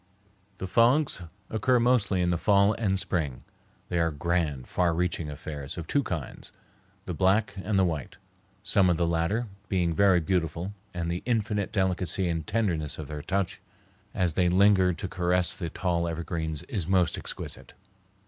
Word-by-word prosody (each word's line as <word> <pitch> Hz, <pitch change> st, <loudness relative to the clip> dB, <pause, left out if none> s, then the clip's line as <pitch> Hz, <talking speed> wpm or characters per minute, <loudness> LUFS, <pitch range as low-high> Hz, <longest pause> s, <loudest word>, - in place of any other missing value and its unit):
The 95 Hz, -, -4 dB
fogs 120 Hz, +5 st, +3 dB, 0.3 s
occur 120 Hz, +3 st, +2 dB
mostly 115 Hz, -6 st, +2 dB
in 90 Hz, -, +1 dB
the 85 Hz, -2 st, 0 dB
fall 100 Hz, +1 st, +4 dB
and 100 Hz, -4 st, 0 dB
spring. 80 Hz, -9 st, -2 dB, 0.5 s
They 85 Hz, -, 0 dB
are 85 Hz, 0 st, +2 dB
grand, 75 Hz, -3 st, -1 dB
far 85 Hz, -2 st, +1 dB
reaching 85 Hz, -2 st, -1 dB
affairs 70 Hz, -1 st, -7 dB
of 85 Hz, -, -5 dB
two 140 Hz, -, +1 dB
kinds, 90 Hz, -, -6 dB, 0.5 s
the -, -, -4 dB
black 100 Hz, +4 st, +2 dB
and 100 Hz, +1 st, 0 dB
the 95 Hz, -, +4 dB
white, 80 Hz, -6 st, -3 dB, 0.5 s
some 100 Hz, -2 st, +3 dB
of 85 Hz, -, +2 dB
the 85 Hz, -, +1 dB
latter 85 Hz, +8 st, 0 dB, 0.2 s
being 90 Hz, -3 st, +1 dB
very 95 Hz, 0 st, +4 dB
beautiful, 85 Hz, +2 st, -1 dB, 0.2 s
and 85 Hz, -2 st, -3 dB
the 85 Hz, -, -3 dB
infinite 105 Hz, -4 st, 0 dB
delicacy 95 Hz, -3 st, +1 dB
and 80 Hz, -3 st, -2 dB
tenderness 90 Hz, -9 st, 0 dB
of 75 Hz, -2 st, -7 dB
their 75 Hz, -1 st, -5 dB
touch 95 Hz, +2 st, -2 dB, 0.5 s
as 90 Hz, -4 st, 0 dB
they 90 Hz, +2 st, +2 dB
linger 95 Hz, 0 st, +5 dB
to 95 Hz, +3 st, -4 dB
caress 90 Hz, 0 st, +1 dB
the 85 Hz, -3 st, -4 dB
tall 85 Hz, 0 st, -1 dB
evergreens 80 Hz, -2 st, -3 dB
is 100 Hz, -, -3 dB
most 90 Hz, -2 st, +2 dB
exquisite. -, -, -7 dB
90 Hz, 165 wpm, -27 LUFS, 85-100 Hz, 0.5 s, linger